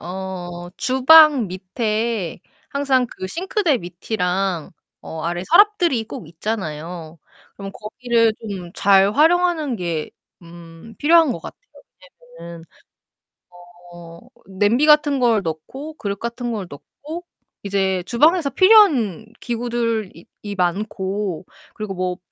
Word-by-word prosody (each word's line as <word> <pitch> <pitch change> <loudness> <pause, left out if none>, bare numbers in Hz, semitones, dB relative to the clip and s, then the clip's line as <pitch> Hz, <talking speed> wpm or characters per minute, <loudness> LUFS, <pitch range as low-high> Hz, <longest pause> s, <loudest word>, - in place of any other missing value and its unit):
어 175 -1 -7
주방 270 0 +6
밑에 215 +1 -3 0.3
항상 275 -3 +1
그 185 - -8
싱크대 360 - 0
밑이랑 180 -1 -3 0.3
어 160 - -7
아래 175 +1 -3
서랍들이 345 - +3
꼭 - - -8
있잖아요. 165 -3 -6 0.4
그럼 195 -1 -7
거기를 230 +1 0 0.2
좀 180 -3 -7
잘 195 +1 +4
활용하는 320 -3 +2
게 170 -5 -3 0.3
음 170 +4 -13
필요한 320 -2 +4
것 - - -6
같아요. - - -11 0.8
왜냐면은 170 -1 -10 1.3
어 170 -1 -12 0.3
냄비 205 +9 +1
같은 300 -2 +4
걸 230 -4 +3
넣고 260 - -6
그릇 200 -6 -4
같은 235 +1 -4
걸 205 -4 -4
넣고 305 - -10 0.4
이제 190 -2 0
주방에서 300 - +3
필요한 325 - +4
기구들이 230 -6 -3 0.2
이 205 -1 -6
많고 190 0 -2 0.3
그리고 215 -3 -5
뭐 180 -1 -2
210 Hz, 230 characters per minute, -20 LUFS, 180-265 Hz, 1.3 s, 주방